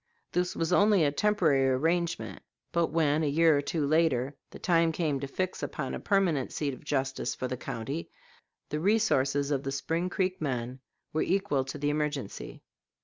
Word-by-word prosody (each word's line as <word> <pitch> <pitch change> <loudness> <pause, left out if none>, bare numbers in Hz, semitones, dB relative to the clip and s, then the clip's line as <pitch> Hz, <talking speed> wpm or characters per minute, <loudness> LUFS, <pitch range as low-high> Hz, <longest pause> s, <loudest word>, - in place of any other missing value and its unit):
This 180 +1 0
was 165 +1 0
only 205 -2 +5
a 145 - +3
temporary 155 -7 +3
arrangement, 165 +6 0 0.3
but 170 -1 +2
when, 155 -1 +2
a 155 - +1
year 160 +2 +4
or 145 - +2
two 150 +1 -1
later, 145 -3 +2
the - - -10
time 165 -2 +3
came 155 -4 -1
to 140 - -4
fix 185 +6 -3
upon 135 -4 -3
a - - -3
permanent 180 -9 +1
seat 145 -3 -2
of - - -11
justice 135 -3 -1
for 130 - -3
the 130 - -3
county, 130 +5 -5 0.6
the 150 - -2
resources 145 -8 +2
of 140 -2 +1
the 135 -1 -3
Spring 165 +6 -1
Creek 185 0 -1
men 125 -3 -2 0.3
were 155 - +1
equal 175 -8 +1
to 135 +3 -6
the 145 0 0
emergency. 150 -6 -3
150 Hz, 180 wpm, -29 LUFS, 135-170 Hz, 0.6 s, only